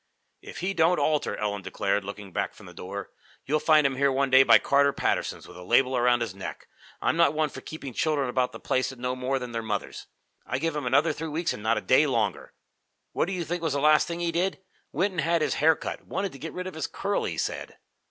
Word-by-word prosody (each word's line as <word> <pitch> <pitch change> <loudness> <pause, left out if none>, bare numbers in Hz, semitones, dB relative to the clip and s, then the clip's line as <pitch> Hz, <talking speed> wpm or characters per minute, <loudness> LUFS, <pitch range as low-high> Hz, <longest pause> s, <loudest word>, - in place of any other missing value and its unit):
"If - - -9
he 190 +2 -1
don't 170 0 +3
alter," 150 0 0
Ellen 105 -1 -2
declared, 100 +1 -1
looking 100 -1 -8
back - - -2
from - - -14
the - - -12
door, 100 +2 -7 0.3
"you'll 155 +2 +1
find 155 -2 +4
him 135 -1 +1
here 140 0 +3
one 135 0 0
day 130 0 +8
by - - +7
Carter 140 0 +3
Patterson's, - - -2
with - - -13
a 90 - -10
label 125 +7 +3
around 120 0 +3
his 115 -5 -2
neck. 95 0 -8 0.4
I'm - - +2
not 170 -2 +3
one 155 -1 +1
for - - -9
keeping 140 -5 -8
children 145 0 0
about 125 0 0
the - - -9
place 130 0 0
that 130 - -10
know 125 +1 -2
more 130 +1 -1
than 125 -2 -6
their 115 -1 -3
mothers. 105 -3 -4 0.4
I 130 - -2
give 165 +2 -2
him 145 -4 -2
another 145 +5 +3
three 160 +2 -5
weeks, 160 +2 -1
and - - -8
not 110 +2 +1
a - - -1
day 145 +4 +4
longer. 115 -6 -1 0.6
What - - 0
do 195 - -3
you 175 -2 -3
think 175 +1 -3
was 160 -4 -1
the 140 - 0
last 150 +1 +4
thing 170 0 -4
he 170 -1 0
did? 180 +3 -1 0.3
Went 185 +8 0
and 175 -3 -2
had 165 -1 +1
his - - 0
hair 160 +1 +6
cut - - -6
wanted 195 -1 -2
to 135 - -12
get 160 +4 -6
rid 180 - -5
of 185 - -6
his 160 - -3
curl, 200 +1 -2
he - - -4
said." - - -4
140 Hz, 255 wpm, -27 LUFS, 125-160 Hz, 0.6 s, day